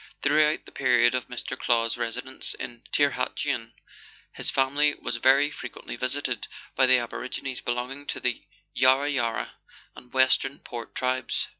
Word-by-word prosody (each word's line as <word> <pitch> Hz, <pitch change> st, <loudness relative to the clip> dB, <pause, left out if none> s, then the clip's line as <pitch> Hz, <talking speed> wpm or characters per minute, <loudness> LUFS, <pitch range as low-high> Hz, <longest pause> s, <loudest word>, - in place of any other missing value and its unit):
Throughout 150 Hz, +1 st, +3 dB
the -, -, -13 dB
period 125 Hz, -2 st, +4 dB
of 125 Hz, -1 st, -2 dB
Mr. 125 Hz, -, -5 dB
Clow's 115 Hz, -2 st, +1 dB
residence 125 Hz, +2 st, -4 dB
at 120 Hz, -1 st, -8 dB
Tirhatuan, 140 Hz, -4 st, 0 dB, 0.6 s
his -, -, -2 dB
family 145 Hz, +2 st, +2 dB
was 120 Hz, 0 st, -3 dB
very 135 Hz, +4 st, +5 dB
frequently -, -, -7 dB
visited 130 Hz, -3 st, -2 dB, 0.3 s
by 130 Hz, -, +5 dB
the 130 Hz, 0 st, +6 dB
aborigines 125 Hz, +2 st, -4 dB
belonging 125 Hz, +4 st, -3 dB
to -, -, -3 dB
the -, -, -1 dB, 0.3 s
Yarra 130 Hz, +3 st, +4 dB
Yarra 120 Hz, -5 st, -1 dB, 0.4 s
and 125 Hz, -, -14 dB
Western 130 Hz, +1 st, +3 dB
Port 120 Hz, -1 st, -8 dB
tribes. 130 Hz, 0 st, -1 dB
130 Hz, 140 wpm, -27 LUFS, 120-140 Hz, 0.6 s, the